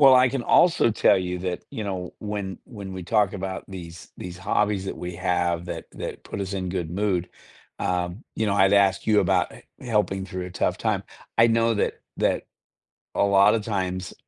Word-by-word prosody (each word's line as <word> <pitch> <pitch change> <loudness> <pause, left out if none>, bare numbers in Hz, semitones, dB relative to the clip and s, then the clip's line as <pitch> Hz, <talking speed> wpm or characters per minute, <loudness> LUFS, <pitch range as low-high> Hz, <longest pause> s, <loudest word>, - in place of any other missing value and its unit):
Well, 135 -2 +9
I 125 -1 +6
can 135 -2 -2
also 170 -7 +5
tell 105 - +4
you 90 -1 -3
that, 90 -1 -3
you 115 -6 -5
know, 95 -3 -4
when 100 -2 -4
when 100 -5 -8
we 95 - -5
talk 105 +1 +2
about 95 -1 -4
these 85 -3 -9
these 90 0 -7
hobbies 100 +1 0
that - - -4
we 90 0 -5
have 90 -1 0
that - - -6
that - - -6
put - - -5
us 100 0 -3
in 95 -2 -2
good 90 -3 -3
mood, 90 -1 0 0.5
um, 90 +4 -2
you 110 - 0
know, 100 - +1
I'd 95 0 +4
ask 100 -1 +4
you 105 -1 +5
about 90 -2 +2 0.2
he - - -12
helping 100 -4 +1
through 90 -1 -5
a - - -8
tough 90 - 0
time. - - 0 0.3
I 115 +1 +6
know 115 0 +3
that 105 - -1 0.2
that - - +1 0.7
a - - +3
lot 100 +1 +5
of 110 -2 -1
times, 95 -4 -2
95 Hz, 200 wpm, -25 LUFS, 90-105 Hz, 0.7 s, Well